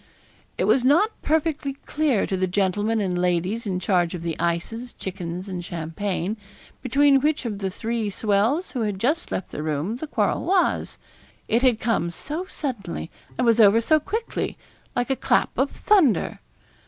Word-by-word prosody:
It - - 0
was 255 - +3
not 335 - +4
perfectly 310 -2 0
clear 295 -8 +1
to 190 - -2
the 185 0 0
gentlemen 205 +4 +1
and 180 -3 0
ladies 180 +6 0
in 185 -2 -1
charge 180 -2 +1
of 170 - -6
the 165 -2 -2
ices, 200 +9 -2
chickens, 180 -1 -5
and 180 -2 -4
champagne, 175 +4 -3 0.4
between 275 +1 +4
which 300 -1 +1
of 210 -4 -3
the 195 -1 -1
three 225 +2 -2
swells 215 - +1
who 250 - -3
had 210 -3 -1
just 290 - 0
left 185 - -3
the - - -5
room 155 +8 -2
the 315 - -6
quarrel - - 0
was 370 0 +1 0.5
it 230 - +2
had 250 -4 +3
come 220 -7 0
so 300 - -4
suddenly, 210 - -4 0.3
and 250 - +1
was 230 0 +4
over 215 +1 +7
so 310 +7 +3
quickly, 445 +9 -3 0.4
like 245 +2 0
a - - +2
clap - - +1
of 270 +2 +1
thunder. 365 - +2
220 Hz, 170 wpm, -24 LUFS, 185-275 Hz, 0.5 s, over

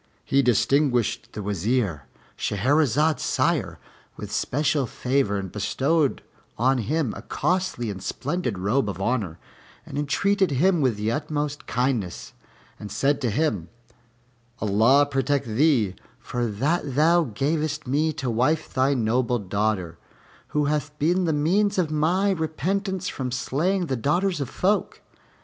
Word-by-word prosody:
He 140 - +3
distinguished 125 0 +1
the 105 - -5
Wazir, 100 - -1 0.3
Shahrazad's 145 - +1
sire, - - 0 0.4
with - - -7
special 145 -1 0
favor 125 -4 0
and 95 -2 -5
bestowed 140 +8 0 0.3
on 130 +3 +2
him 140 +1 -1
a - - -7
costly 180 - -1
and 95 -2 -8
splendid 145 - -3
robe 105 +6 +1
of 95 -2 -5
honor, 100 -6 -1 0.5
and - - -5
entreated 190 +6 +1
him 165 +5 +2
with 125 -6 +1
the 105 +2 -1
utmost 150 +1 -3
kindness, 120 -8 -2 0.5
and 105 - -8
said 140 +6 +1
to 125 - +1
him, 105 - -1 0.9
"Allah 115 +7 +4
protect 140 0 0
thee 115 - +2 0.2
for 120 -1 -3
that 135 +6 -1
thou 165 +3 +4
gavest 150 +5 -2
me 150 +5 +1
to 130 - -4
wife 140 +8 0
thy 135 +2 +2
noble 120 +1 +1
daughter, 100 -4 -2 0.5
who 150 -1 0
hath 150 0 -2
been 175 +5 +2
the 165 - +1
means 185 +8 +1
of 170 -4 +1
my 175 +6 +2
repentance 185 +3 -2
from 130 -2 -3
slaying 170 +9 0
the 135 - -1
daughters 175 - 0
of 135 - -3
folk. 200 +8 0
140 Hz, 135 wpm, -24 LUFS, 115-155 Hz, 0.9 s, Allah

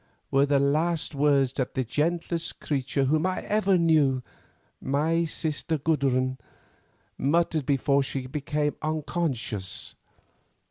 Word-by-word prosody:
were 135 +1 +4
the 140 0 +3
last 155 +4 +1
words 140 -2 +2
that 130 -3 -3
the 130 - +1
gentlest 165 +6 -2
creature 140 -1 -1
whom 155 +4 +2
I 185 - -2
ever 200 -3 +2
knew, 150 -6 +3 0.6
my 160 +5 +1
sister 160 0 -2
Gudrun, 130 -4 0 0.8
muttered 160 0 +1
before 140 0 +2
she 135 -1 -3
became 150 +2 -2
unconscious. 145 - -3
145 Hz, 110 wpm, -26 LUFS, 135-160 Hz, 0.8 s, were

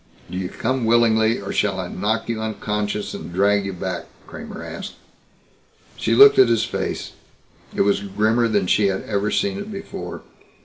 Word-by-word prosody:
"Do - - -5
you 90 -1 -3
come 130 +2 -2
willingly 115 0 +3
or 100 - -5
shall 100 -2 0
I 90 - -3
knock 105 +5 -2
you 115 -1 -2
unconscious 105 -1 -3
and - - -7
drag 100 +2 +2
you 95 - -4
back?" 90 - -4 0.2
Kramer - - -9
asked. - - -7 1.0
She 115 - 0
looked 210 - +8
at 130 -3 +7
his 115 -1 +2
face. 115 - -3 0.6
It - - +1
was 100 0 +3
grimmer 105 +4 +1
than 105 -4 +1
she 100 +3 +3
had 95 -1 -2
ever 105 0 -1
seen 200 - 0
it 205 +2 -7
before. 195 -1 -7
105 Hz, 175 wpm, -22 LUFS, 100-115 Hz, 1.0 s, looked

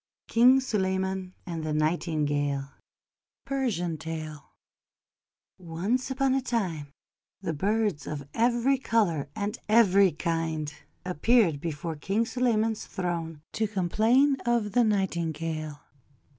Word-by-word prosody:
KING 250 +3 +6
SULEYMAN 190 -5 -1
AND 165 -3 -4
THE 155 -1 -2
NIGHTINGALE 145 -3 0 0.7
Persian 205 - -1
Tale 155 -2 -6 1.1
ONCE 185 +10 -2
upon 265 0 +1
a 270 - +1
time, 190 - -2 0.6
the 165 -3 -1
birds 200 -2 0
of 140 -2 -5
every 240 +3 +2
colour 175 - +1
and 205 +1 -3
every 200 -4 +5
kind 160 -2 -2 0.3
appeared 180 -3 +2
before 165 0 -4
King 195 +9 0
Suleyman's 225 -3 0
throne 165 -4 -4
to 220 0 0
complain 220 +8 +3
of 235 -4 +1
the 245 +4 +4
Nightingale. 165 -7 -1
185 Hz, 105 wpm, -27 LUFS, 160-230 Hz, 1.1 s, KING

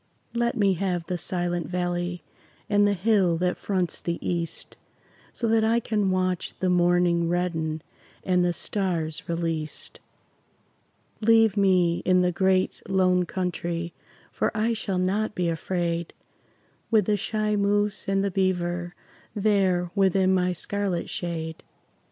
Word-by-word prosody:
Let 235 0 0
me 200 -3 +3
have 180 -2 -2
the 180 - -2
Silent 175 -1 -2
Valley 175 -1 -2 0.4
And 205 0 +4
the 205 - +2
hill 190 -3 +2
that 180 +1 0
fronts 185 -4 -2
the 170 -1 -2
east, 170 -2 -3 0.6
So 235 - -2
that 225 0 +3
I 225 +2 +3
can 210 -4 0
watch 185 -1 -1
the 185 -1 +1
morning 175 -1 +3
Redden 165 -3 -1 0.4
and 180 -1 +2
the 175 - +2
stars 170 -4 -2
released. 165 -2 -3 1.2
Leave 225 -1 +5
me 185 -4 +3
in 185 0 +4
the 180 - +2
Great 190 +1 +1
Lone 185 -2 +3
Country, 175 -2 -3 0.4
For - - 0
I 225 +2 +2
shall 200 -4 -2
not 205 +4 0
be 175 -2 0
afraid 170 0 -2 0.7
With 220 -4 +4
the 210 - +2
shy 215 +1 -1
moose 205 +1 0
and 195 0 +1
the 200 - 0
beaver 175 -2 -1 0.4
There 195 -4 +2
within 190 -1 +3
my 180 -1 +2
scarlet 190 0 -2
shade. 160 -2 -4
180 Hz, 135 wpm, -26 LUFS, 175-200 Hz, 1.2 s, Leave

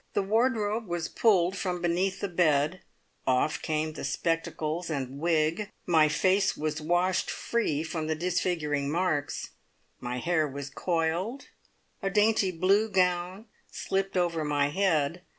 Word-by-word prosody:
The 200 - +1
wardrobe 220 0 +1
was 170 -1 -2
pulled 190 -5 +2
from 180 -3 -2
beneath 180 +3 0
the 200 - 0
bed, 165 -1 +1 0.5
off 130 +4 +1
came 155 0 -1
spectacles 165 +2 -2
and 135 -3 -4
wig, 165 +4 +1 0.2
my 160 -3 +4
face 185 +5 +2
was 155 0 -2
washed 175 +4 +1
free 160 -11 -1
from 160 -1 -4
the 160 - 0
disfiguring 155 -4 -1
marks, 160 -3 -1 0.5
my 125 0 -4
hair 160 +2 +1
was 140 0 -7
coiled, 175 - -2 0.5
a 195 - 0
dainty 210 0 +3
blue 190 +5 +2
gown 180 +1 0 0.2
slipped 195 0 -2
over 170 -3 +1
my 145 -1 +1
head. 165 -2 +1
175 Hz, 135 wpm, -28 LUFS, 155-190 Hz, 0.5 s, my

